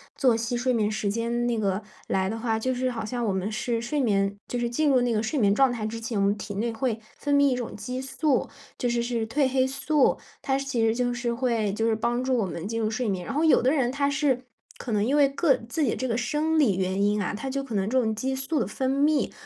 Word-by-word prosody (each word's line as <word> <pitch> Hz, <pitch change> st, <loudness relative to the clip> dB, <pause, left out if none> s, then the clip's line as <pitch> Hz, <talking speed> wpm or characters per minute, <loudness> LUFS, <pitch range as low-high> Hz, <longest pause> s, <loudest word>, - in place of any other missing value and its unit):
作 250 Hz, -5 st, +3 dB
息 230 Hz, +1 st, -2 dB
睡 250 Hz, +2 st, +1 dB
眠 220 Hz, -4 st, +1 dB
时 215 Hz, -1 st, -1 dB
间 235 Hz, +2 st, -1 dB
那 235 Hz, -2 st, 0 dB
个 200 Hz, 0 st, -1 dB, 0.2 s
来 190 Hz, 0 st, 0 dB
的 225 Hz, +2 st, -4 dB
话， 225 Hz, -1 st, 0 dB
就 255 Hz, +4 st, -1 dB
是 255 Hz, +1 st, -1 dB
好 230 Hz, -3 st, -4 dB
像 240 Hz, +2 st, -3 dB
我 205 Hz, -, 0 dB
们 190 Hz, +3 st, -2 dB
是 230 Hz, +2 st, -1 dB
睡 265 Hz, +6 st, -2 dB
眠， 200 Hz, -6 st, +2 dB
就 245 Hz, -, -3 dB
是 240 Hz, -1 st, -1 dB
进 295 Hz, +5 st, +1 dB
入 260 Hz, -2 st, +4 dB
那 245 Hz, -1 st, +1 dB
个 215 Hz, -2 st, +1 dB
睡 230 Hz, +7 st, -2 dB
眠 200 Hz, -6 st, +4 dB
状 270 Hz, +4 st, +4 dB
态 235 Hz, -3 st, -3 dB
之 225 Hz, +1 st, -4 dB
前， 230 Hz, -1 st, -3 dB
我 195 Hz, -, +2 dB
们 200 Hz, -, +3 dB
体 205 Hz, 0 st, -6 dB
内 225 Hz, +4 st, -1 dB
会 225 Hz, 0 st, -1 dB, 0.2 s
分 285 Hz, -1 st, 0 dB
泌 285 Hz, 0 st, +5 dB
一 -, -, +1 dB
种 240 Hz, -2 st, -5 dB
激 250 Hz, +5 st, -5 dB
素， 270 Hz, 0 st, 0 dB, 0.3 s
就 245 Hz, -, 0 dB
是 235 Hz, 0 st, 0 dB
是 235 Hz, -2 st, -2 dB
褪 280 Hz, +5 st, +1 dB
黑 260 Hz, 0 st, +2 dB
素。 280 Hz, +1 st, +2 dB, 0.2 s
它 270 Hz, -1 st, 0 dB
其 275 Hz, -3 st, -2 dB
实 225 Hz, 0 st, +3 dB
就 245 Hz, 0 st, 0 dB
是 240 Hz, 0 st, -2 dB
会 235 Hz, -5 st, 0 dB
就 225 Hz, +2 st, -1 dB
是 -, -, +2 dB
帮 235 Hz, +3 st, 0 dB
助 260 Hz, -1 st, +1 dB
我 220 Hz, -, +1 dB
们 170 Hz, -1 st, -5 dB
进 225 Hz, +2 st, -2 dB
入 215 Hz, -1 st, 0 dB
睡 225 Hz, +1 st, -1 dB
眠。 185 Hz, -3 st, -2 dB
然 -, -, -4 dB
后 300 Hz, +3 st, +1 dB
有 320 Hz, -, +5 dB
的 250 Hz, -, +3 dB
人 260 Hz, -5 st, +1 dB
他 280 Hz, +1 st, 0 dB
是 285 Hz, -3 st, +1 dB, 0.4 s
可 240 Hz, -, -5 dB
能 205 Hz, -1 st, +2 dB
因 275 Hz, +5 st, +2 dB
为 285 Hz, -1 st, +6 dB
个 275 Hz, +1 st, +2 dB
自 305 Hz, +6 st, -1 dB
己 250 Hz, -, +1 dB
这 260 Hz, -, -2 dB
个 230 Hz, -, 0 dB
生 300 Hz, +6 st, 0 dB
理 255 Hz, -11 st, +4 dB
原 190 Hz, +1 st, 0 dB
因 205 Hz, +1 st, +2 dB
啊， 185 Hz, -, -2 dB
他 225 Hz, +6 st, -4 dB
就 275 Hz, +1 st, -2 dB
可 265 Hz, -5 st, -6 dB
能 195 Hz, 0 st, 0 dB
这 260 Hz, +2 st, +3 dB
种 220 Hz, -2 st, -1 dB
激 260 Hz, +5 st, -2 dB
素 270 Hz, +3 st, -1 dB
的 -, -, 0 dB
分 260 Hz, -1 st, -2 dB
泌， 290 Hz, +2 st, +2 dB
240 Hz, 300 characters per minute, -26 LUFS, 220-265 Hz, 0.4 s, 为